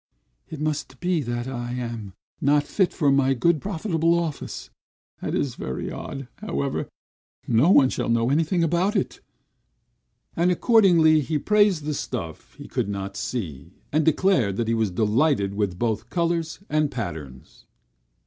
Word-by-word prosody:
"It 160 - -7
must 155 -1 -3
be, 175 -2 0
that 120 -1 -3
I 120 -2 -4
am 115 -5 -5 0.3
not 145 +1 +3
fit 185 +5 +1
for 145 -5 +2
my 135 -1 +3
good, 160 +5 +2
profitable 170 -3 0
office! 165 -4 -4 0.5
That - - -2
is 135 -4 -1
very 65 - -5
odd; 135 -2 -6
however, 140 -10 -3 0.6
no 120 +8 +4
one 140 -8 +6
shall - - -2
know 115 +2 +2
anything 165 +4 +2
about 175 +6 +1
it." 195 - -2 1.1
And 170 +2 +2
accordingly 175 -7 +5
he 150 +2 -1
praised 205 -1 +3
the 150 +1 -2
stuff 95 - -6
he - - -10
could - - -2
not 100 -1 -4
see, 90 - -5 0.2
and 155 +2 +2
declared 155 - +2
that 115 - -1
he 115 - +1
was 110 -2 +1
delighted 105 - +1
with 100 -3 -1
both 115 +1 -2
colors 170 +1 -1
and 155 -1 +1
patterns. 80 - -7
140 Hz, 150 wpm, -24 LUFS, 115-165 Hz, 1.1 s, one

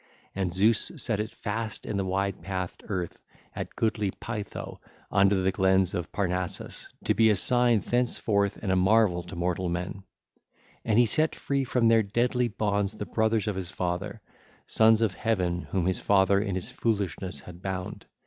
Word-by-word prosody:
And 95 -2 -1
Zeus 105 +5 +3
set 110 -5 +1
it 110 +1 -3
fast 110 +1 -4
in - - -3
the 100 - 0
wide 95 +1 -1
pathed 95 -2 -4
earth 90 -4 -4 0.3
at - - -6
goodly 105 -2 0
Pytho 115 0 -6 0.3
under 100 0 +4
the 95 - +2
glens 95 -1 +2
of 90 -3 -4
Parnassus, 90 -2 -2 0.2
to - - +2
be 110 +2 +4
a 105 - +4
sign 120 +1 +3
thenceforth 110 -4 0
and 95 - 0
a - - +3
marvel 95 -1 +3
to 90 +2 -10
mortal 90 +1 -1
men 90 +3 -4 0.8
1620. 115 - -3
And 105 - +3
he 120 - +6
set 155 +8 +1
free 140 -1 -1
from 125 -2 +1
their 115 0 +5
deadly 120 +4 +1
bonds 105 -2 -1
the 105 - -5
brothers 110 -1 +1
of 105 - -1
his 95 -2 -4
father, 95 +4 -3 0.4
sons 110 0 +4
of 105 -5 +1
Heaven 90 -4 -1
whom 95 -3 0
his 95 0 +1
father 100 0 +4
in 100 -3 -2
his 95 +6 -4
foolishness 95 - -2
had 90 +2 -12
bound. 95 -1 -5
100 Hz, 175 wpm, -27 LUFS, 95-110 Hz, 0.8 s, he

